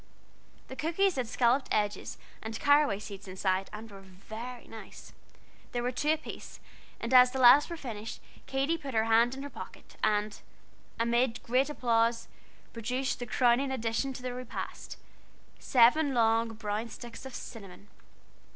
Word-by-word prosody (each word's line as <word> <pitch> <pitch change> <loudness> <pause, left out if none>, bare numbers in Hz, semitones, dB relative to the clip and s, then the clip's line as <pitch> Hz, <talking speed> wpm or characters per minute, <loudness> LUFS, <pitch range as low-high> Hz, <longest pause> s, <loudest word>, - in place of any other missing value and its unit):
The 260 - -8
cookies 340 +6 +1
had 250 -3 -1
scalloped 245 +3 +2
edges 205 -2 -1 0.2
and 220 0 -5
caraway 285 -7 +4
seeds 200 -1 -9
inside, 185 0 -1
and 215 +1 -9
were 195 - -10
very 220 +6 -9
nice. 225 -1 -11 0.6
There 240 0 -1
were 250 - 0
two 290 +4 -1
apiece; 315 - -8 0.4
and 235 +2 -3
as 250 0 +8
the 265 +1 -4
last 260 +5 +7
was 340 -1 -6
finished, 225 -4 -6 0.3
Katy 275 +5 0
put 275 -5 -6
her 220 - +3
hand 230 +3 +3
in 270 - -7
her 285 - -6
pocket, - - -11
and 210 0 0 0.6
amid 235 +1 +1
great 255 +4 +2
applause, 230 -4 +1 0.5
produced 250 +4 -2
the 245 - -5
crowning 245 +4 +3
addition 250 +1 -1
to 250 - -9
the 250 -1 -3
repast 250 -1 -7 0.6
seven 265 +3 +4
long, 225 0 +2
brown 215 +1 -3
sticks 235 0 -10
of 265 - -10
cinnamon. 200 -3 -10
240 Hz, 150 wpm, -30 LUFS, 220-265 Hz, 0.6 s, as